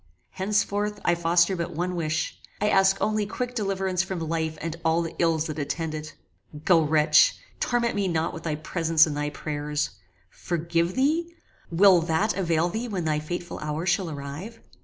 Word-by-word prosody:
Henceforth 205 Hz, +1 st, -1 dB
I 175 Hz, -, +4 dB
foster 170 Hz, +2 st, +3 dB
but 170 Hz, -3 st, -4 dB
one 180 Hz, +2 st, -2 dB
wish 160 Hz, -1 st, -2 dB, 0.2 s
I 210 Hz, -, +2 dB
ask 195 Hz, -1 st, +4 dB
only 215 Hz, -1 st, 0 dB
quick 250 Hz, +3 st, -4 dB
deliverance 195 Hz, -4 st, 0 dB
from 190 Hz, 0 st, -4 dB
life 160 Hz, -1 st, -2 dB
and 165 Hz, 0 st, -4 dB
all 165 Hz, +1 st, +2 dB
the 165 Hz, -, -5 dB
ills 165 Hz, -2 st, +2 dB
that 155 Hz, -1 st, -4 dB
attend 160 Hz, +2 st, -3 dB
it. 155 Hz, -1 st, -7 dB, 0.5 s
Go 175 Hz, -3 st, +5 dB
wretch! 150 Hz, 0 st, +4 dB, 0.2 s
torment 235 Hz, -1 st, +1 dB
me 200 Hz, -2 st, 0 dB
not 165 Hz, -2 st, -1 dB
with 165 Hz, -, -7 dB
thy 160 Hz, -2 st, -2 dB
presence 160 Hz, +1 st, +3 dB
and 150 Hz, -2 st, -4 dB
thy 150 Hz, 0 st, -1 dB
prayers. 150 Hz, 0 st, -3 dB, 0.4 s
Forgive 170 Hz, +1 st, -1 dB
thee? 325 Hz, +6 st, +1 dB, 0.3 s
Will 180 Hz, +1 st, +6 dB
that 170 Hz, +6 st, 0 dB
avail 170 Hz, -3 st, +1 dB
thee 225 Hz, +7 st, -3 dB
when 190 Hz, -7 st, -3 dB
thy 155 Hz, -1 st, +1 dB
fateful 175 Hz, +3 st, -5 dB
hour 150 Hz, +2 st, -3 dB
shall 185 Hz, -1 st, +1 dB
arrive? 150 Hz, +10 st, -7 dB
170 Hz, 175 wpm, -26 LUFS, 160-195 Hz, 0.5 s, Will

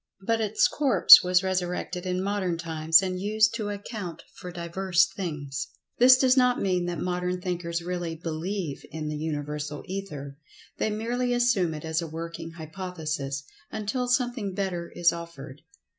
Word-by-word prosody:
But 225 Hz, +1 st, +1 dB
its 215 Hz, 0 st, +3 dB
corpse 255 Hz, -, +7 dB
was 180 Hz, +1 st, +3 dB
resurrected 180 Hz, -1 st, -2 dB
in 185 Hz, 0 st, -1 dB
modern 195 Hz, -4 st, -1 dB
times, 160 Hz, +1 st, +3 dB
and 185 Hz, -1 st, -2 dB
used 215 Hz, +2 st, +2 dB
to 215 Hz, -3 st, -3 dB
account 200 Hz, -4 st, -6 dB
for 180 Hz, -, -9 dB
divers 175 Hz, +1 st, +1 dB
things. 145 Hz, -6 st, -4 dB, 0.3 s
This 255 Hz, +1 st, +8 dB
does 255 Hz, 0 st, +4 dB
not 250 Hz, -1 st, +3 dB
mean 180 Hz, -2 st, 0 dB
that 175 Hz, -1 st, -3 dB
modern 180 Hz, +2 st, -2 dB
thinkers 170 Hz, -2 st, -3 dB
really 175 Hz, -2 st, -3 dB
"believe" 165 Hz, 0 st, -4 dB
in 155 Hz, -1 st, -5 dB
the 150 Hz, -, -3 dB
Universal 150 Hz, -1 st, -4 dB
Ether—they 150 Hz, -3 st, -6 dB
merely 240 Hz, +3 st, -1 dB
assume 220 Hz, -10 st, +2 dB
it 150 Hz, -, -7 dB
as 160 Hz, +1 st, -1 dB
a 165 Hz, -, -4 dB
working 165 Hz, +1 st, -7 dB
hypothesis 160 Hz, -4 st, -5 dB, 0.3 s
until 220 Hz, +4 st, -2 dB
something 245 Hz, -6 st, 0 dB
better 180 Hz, -4 st, -3 dB
is 170 Hz, -1 st, +3 dB
offered. 165 Hz, -5 st, -9 dB
180 Hz, 150 wpm, -26 LUFS, 160-200 Hz, 0.3 s, This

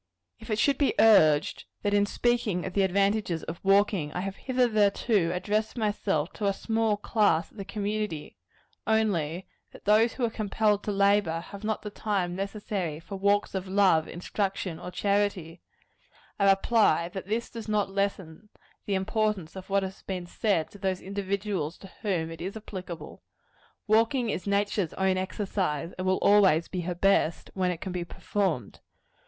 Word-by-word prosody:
If -, -, -12 dB
it 215 Hz, -, 0 dB
should 275 Hz, +4 st, +2 dB
be 285 Hz, -, +2 dB
urged, 155 Hz, -9 st, +5 dB, 0.2 s
that 205 Hz, -1 st, +1 dB
in 205 Hz, 0 st, +3 dB
speaking 225 Hz, -7 st, 0 dB
of 190 Hz, -, -5 dB
the 200 Hz, -, +2 dB
advantages 195 Hz, -2 st, +1 dB
of 165 Hz, +1 st, -6 dB
walking, 195 Hz, -5 st, +3 dB
I 180 Hz, -, -2 dB
have 195 Hz, 0 st, -4 dB
hitherto 215 Hz, -7 st, +2 dB
addressed 210 Hz, +5 st, -1 dB
myself 205 Hz, -7 st, -1 dB
to 205 Hz, -, -2 dB
a 200 Hz, -, +2 dB
small 220 Hz, 0 st, 0 dB
class 205 Hz, -6 st, +1 dB
of -, -, -21 dB
the 195 Hz, -, -5 dB
community, 205 Hz, -5 st, -3 dB, 0.5 s
only 190 Hz, -7 st, +1 dB, 0.3 s
that -, -, -15 dB
those 220 Hz, +3 st, +4 dB
who 250 Hz, -, 0 dB
are 230 Hz, -, -2 dB
compelled 210 Hz, -1 st, +1 dB
to 210 Hz, -, -1 dB
labor, 200 Hz, -4 st, +2 dB
have 200 Hz, +3 st, -10 dB
not 215 Hz, 0 st, -2 dB
the 210 Hz, -, -5 dB
time 195 Hz, -5 st, -1 dB
necessary 195 Hz, -5 st, -3 dB
for 195 Hz, +4 st, -8 dB
walks 200 Hz, +1 st, +1 dB
of 190 Hz, -1 st, -3 dB
love, 190 Hz, -5 st, +3 dB
instruction 190 Hz, -1 st, -3 dB
or -, -, -7 dB
charity 195 Hz, -3 st, -1 dB, 0.8 s
I 200 Hz, -1 st, +5 dB
reply, 195 Hz, -4 st, +3 dB
that 190 Hz, +1 st, -7 dB
this 225 Hz, +3 st, -2 dB
does 225 Hz, -2 st, -7 dB
not 205 Hz, -2 st, +1 dB
lessen 195 Hz, -1 st, -3 dB, 0.4 s
the 200 Hz, -, +1 dB
importance 210 Hz, -3 st, -1 dB
of 190 Hz, 0 st, -9 dB
what 195 Hz, 0 st, +2 dB
has 190 Hz, 0 st, -6 dB
been 185 Hz, -2 st, -5 dB
said 175 Hz, -3 st, 0 dB
to 205 Hz, -, -13 dB
those 190 Hz, -1 st, -1 dB
individuals 195 Hz, -4 st, -3 dB
to 195 Hz, -, -13 dB
whom 170 Hz, -6 st, -1 dB
it 165 Hz, -, -9 dB
is 195 Hz, +5 st, -4 dB
applicable. 180 Hz, -6 st, -8 dB, 0.6 s
Walking 225 Hz, +3 st, +2 dB
is 180 Hz, -, -4 dB
nature's 200 Hz, -3 st, 0 dB
own 190 Hz, -1 st, +1 dB
exercise; 185 Hz, -5 st, -2 dB
and 185 Hz, -, -2 dB
will 185 Hz, -, +3 dB
always 190 Hz, -6 st, +5 dB
be 180 Hz, -, -3 dB
her 175 Hz, +1 st, -3 dB
best, 180 Hz, -2 st, +1 dB
when 185 Hz, -1 st, 0 dB
it 175 Hz, -2 st, -4 dB
can 190 Hz, -, -4 dB
be 180 Hz, -1 st, -2 dB
performed. 170 Hz, -, -2 dB
195 Hz, 170 wpm, -28 LUFS, 180-210 Hz, 0.8 s, urged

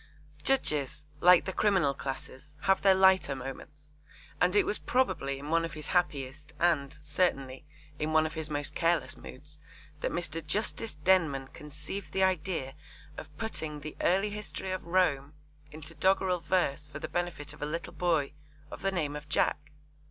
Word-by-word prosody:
Judges, 150 Hz, -, 0 dB, 0.2 s
like 180 Hz, +1 st, +7 dB
the 190 Hz, -, -3 dB
criminal 190 Hz, -10 st, +3 dB
classes, 135 Hz, +1 st, -7 dB
have 195 Hz, 0 st, +3 dB
their 195 Hz, -1 st, +6 dB
lighter 190 Hz, -6 st, +5 dB
moments, 145 Hz, +3 st, -9 dB, 0.5 s
and 180 Hz, +2 st, +3 dB
it 205 Hz, -, +5 dB
was 210 Hz, -, 0 dB
probably 140 Hz, -, 0 dB
in 145 Hz, +2 st, -7 dB
one 165 Hz, 0 st, +3 dB
of 165 Hz, -1 st, -4 dB
his 155 Hz, -1 st, -4 dB
happiest 145 Hz, -4 st, -1 dB
and, 150 Hz, -5 st, +1 dB
certainly, 145 Hz, -4 st, 0 dB, 0.3 s
in 155 Hz, +1 st, -1 dB
one 155 Hz, 0 st, +4 dB
of 155 Hz, -, -3 dB
his 160 Hz, -1 st, -4 dB
most 145 Hz, -1 st, -1 dB
careless 170 Hz, 0 st, +1 dB
moods 150 Hz, +3 st, -11 dB, 0.4 s
that -, -, -1 dB
Mr. 165 Hz, -1 st, -3 dB
Justice 210 Hz, +5 st, -2 dB
Denman 150 Hz, -5 st, +2 dB
conceived 150 Hz, +6 st, -8 dB
the 190 Hz, -, +2 dB
idea 175 Hz, -7 st, 0 dB, 0.4 s
of 150 Hz, -1 st, -10 dB
putting 155 Hz, -9 st, -4 dB
the 155 Hz, +1 st, -7 dB
early 195 Hz, +3 st, +2 dB
history 205 Hz, -2 st, -5 dB
of 185 Hz, -, -3 dB
Rome 150 Hz, -5 st, +1 dB, 0.4 s
into 155 Hz, +1 st, -9 dB
doggerel 185 Hz, +2 st, +2 dB
verse 155 Hz, -5 st, 0 dB
for 150 Hz, -, -8 dB
the -, -, -5 dB
benefit 175 Hz, -5 st, -3 dB
of -, -, -15 dB
a 145 Hz, -, -1 dB
little 165 Hz, +2 st, -4 dB
boy 160 Hz, -6 st, +1 dB, 0.4 s
of -, -, -8 dB
the 195 Hz, -, +1 dB
name 155 Hz, -6 st, -1 dB
of 150 Hz, 0 st, -8 dB
Jack. 145 Hz, 0 st, 0 dB
155 Hz, 165 wpm, -30 LUFS, 145-185 Hz, 0.5 s, like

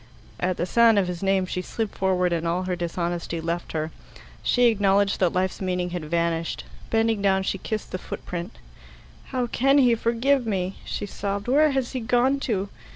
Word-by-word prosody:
At 180 Hz, 0 st, 0 dB
the -, -, 0 dB
sound 230 Hz, +3 st, +5 dB
of 200 Hz, -, +3 dB
his 180 Hz, -1 st, -4 dB
name 195 Hz, -1 st, +2 dB
she 180 Hz, 0 st, -3 dB
slid 220 Hz, +3 st, -3 dB
forward, 180 Hz, -2 st, +1 dB
and 170 Hz, 0 st, -1 dB
all 175 Hz, +2 st, 0 dB
her 185 Hz, -1 st, -1 dB
dishonesty 170 Hz, -1 st, -3 dB
left 170 Hz, +1 st, -3 dB
her. 155 Hz, 0 st, -2 dB, 0.5 s
She 245 Hz, 0 st, +3 dB
acknowledged 200 Hz, -3 st, +3 dB
that 180 Hz, -3 st, +3 dB
life's 185 Hz, +1 st, -1 dB
meaning 180 Hz, -1 st, -1 dB
had 175 Hz, -3 st, -4 dB
vanished. 170 Hz, 0 st, -1 dB, 0.3 s
Bending 225 Hz, -2 st, +2 dB
down, 190 Hz, -1 st, +2 dB
she 195 Hz, -, -2 dB
kissed 215 Hz, +2 st, -4 dB
the 185 Hz, -, -3 dB
footprint. 175 Hz, +4 st, -6 dB, 0.7 s
"How 255 Hz, -2 st, -1 dB
can 270 Hz, +4 st, +3 dB
he 250 Hz, -4 st, +5 dB
forgive 235 Hz, +3 st, +1 dB
me?" 190 Hz, -2 st, -1 dB
she -, -, -3 dB
sobbed. 200 Hz, +1 st, -4 dB
"Where 300 Hz, +5 st, +5 dB
has 265 Hz, -3 st, -1 dB
he 260 Hz, -, -3 dB
gone 245 Hz, +4 st, +2 dB
to? 200 Hz, -2 st, 0 dB
195 Hz, 185 wpm, -25 LUFS, 180-230 Hz, 0.7 s, sound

